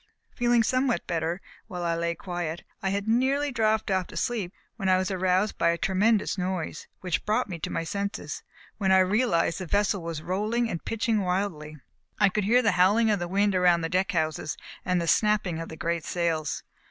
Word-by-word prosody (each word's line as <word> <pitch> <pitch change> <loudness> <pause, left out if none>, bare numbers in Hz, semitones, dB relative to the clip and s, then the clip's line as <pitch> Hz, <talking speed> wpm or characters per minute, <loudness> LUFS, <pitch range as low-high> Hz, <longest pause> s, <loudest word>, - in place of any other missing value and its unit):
Feeling 240 -1 +3
somewhat 255 +2 +1
better, 170 +2 -2 0.3
while 180 -1 -5
I 170 -1 +1
lay 170 0 -1
quiet, 175 -1 -4 0.2
I 190 - 0
had 200 +2 -2
nearly 270 +5 +2
dropped 220 -3 +1
off 185 -2 +1
to - - -9
sleep 215 -7 -1 0.2
when 195 -4 -1
I 185 - +5
was 185 +1 -1
aroused 185 +2 +1
by 170 - +4
a 170 - +1
tremendous 205 +3 +1
noise, 180 -4 -3
which 180 -4 -1
brought 220 +4 +1
me 175 -4 -6
to - - -4
my - - -2
senses, 200 +4 -4 0.4
when 190 -2 +2
I 190 - +7
realized 185 -3 +2
that 185 - -4
the 200 - +1
vessel 205 -1 +1
was 165 -2 -5
rolling 215 +6 0
and 170 - -4
pitching 225 -1 0
wildly. 180 -5 -2 0.4
I 200 -2 +5
could 205 +1 -1
hear 245 +4 +4
the 220 - +4
howling 215 +4 +4
of 205 - +1
the 175 - -3
wind 200 +2 +2
around 180 -2 +4
the 165 - -2
deck 185 +2 +1
houses, 155 -2 -1 0.3
and 180 0 +1
the 170 - -1
snapping 210 -4 +2
of 165 - -6
the 160 - -8
great 170 0 -1
sails. 165 -3 -1
190 Hz, 205 wpm, -27 LUFS, 170-215 Hz, 0.4 s, I